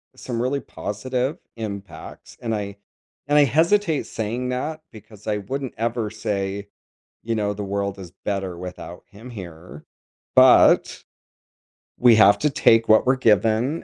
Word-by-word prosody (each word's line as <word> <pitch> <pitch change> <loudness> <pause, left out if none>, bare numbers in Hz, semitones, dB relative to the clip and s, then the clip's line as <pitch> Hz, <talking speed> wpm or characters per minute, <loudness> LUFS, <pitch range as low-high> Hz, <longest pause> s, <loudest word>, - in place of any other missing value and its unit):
some 120 -2 -4
really 135 +3 -1
positive 130 - -4 0.2
impacts, 100 -3 -8
and 115 -2 -2
I 100 -1 -5 0.5
and 145 - +3
I 145 - +7
hesitate 165 - +2
saying 120 +3 -3
that 155 +5 -3
because 110 -1 -15
I 105 - 0
wouldn't 130 +6 -5
ever 115 -1 -2
say, 100 -2 -4 0.6
you 115 0 -2
know, 105 -1 -1
"the 105 - -6
world 100 0 -3
is 90 -3 -9
better 95 -3 -3
without 90 -1 -9
him 110 +5 -13
here," 85 -7 -10 0.5
but - - +5 0.9
we 120 -2 +6
have 100 -1 +6
to 150 - +1
take 115 -3 +4
what 110 +3 +5
we're 130 +1 +3
given 115 - +2
110 Hz, 145 wpm, -22 LUFS, 100-125 Hz, 0.9 s, I